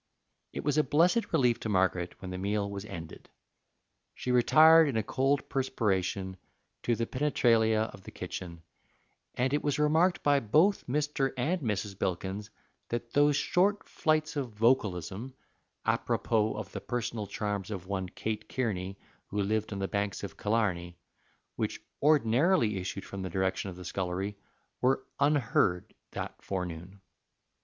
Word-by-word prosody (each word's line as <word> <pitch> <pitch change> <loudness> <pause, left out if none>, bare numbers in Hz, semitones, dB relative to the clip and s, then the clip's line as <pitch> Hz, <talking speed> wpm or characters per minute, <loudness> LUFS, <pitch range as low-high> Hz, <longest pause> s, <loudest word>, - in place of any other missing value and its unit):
It - - -5
was 145 +1 +2
a - - +5
blessed 170 - +2
relief 125 -7 +3
to 110 - -4
Margaret 95 -3 0
when 95 -1 -7
the 90 - -4
meal 100 +1 0
was 100 0 -6
ended. 85 -5 -9 0.9
She 125 - -3
retired 155 +6 +7
in 120 - -1
a 110 - +1
cold 135 +6 +1
perspiration 95 -7 -1 0.4
to 120 - +1
the 115 - -1
penetralia 115 -5 +2
of 95 - -12
the - - -10
kitchen, 85 -2 -7 0.7
and 130 +2 0
it 145 - +2
was 145 -2 0
remarked 160 +4 +3
by 145 -1 +4
both 155 - +3
Mr. 145 0 0
and 165 +8 0
Mrs. 105 -4 -2
Bilkins 95 +3 -2 0.4
that 120 0 -4
those 145 0 +4
short 200 +7 +1
flights 155 0 0
of 130 -6 -3
vocalism 105 0 0 0.5
apropos 110 -1 +1
of 110 - -6
the - - -6
personal 115 -3 -3
charms 100 -1 -3
of 95 -4 -5
one 95 -1 -3
Kate 110 +3 -4
Kearney, 100 -6 -2 0.3
who 105 - -3
lived 110 +2 -1
on 100 - -3
the 95 0 -1
banks 100 0 -2
of 100 - -6
Killarney 95 -6 -1 0.6
which - - -2 0.2
ordinarily 135 - +3
issued 95 +1 -5
from 100 - -6
the 95 - -3
direction 95 +2 -1
of 90 - -8
the 90 0 -10
scullery, 95 +3 -2 0.5
were 130 +1 +2
unheard 135 -11 +2 0.2
that - - -5
forenoon. 90 0 -5
110 Hz, 150 wpm, -30 LUFS, 95-135 Hz, 0.9 s, retired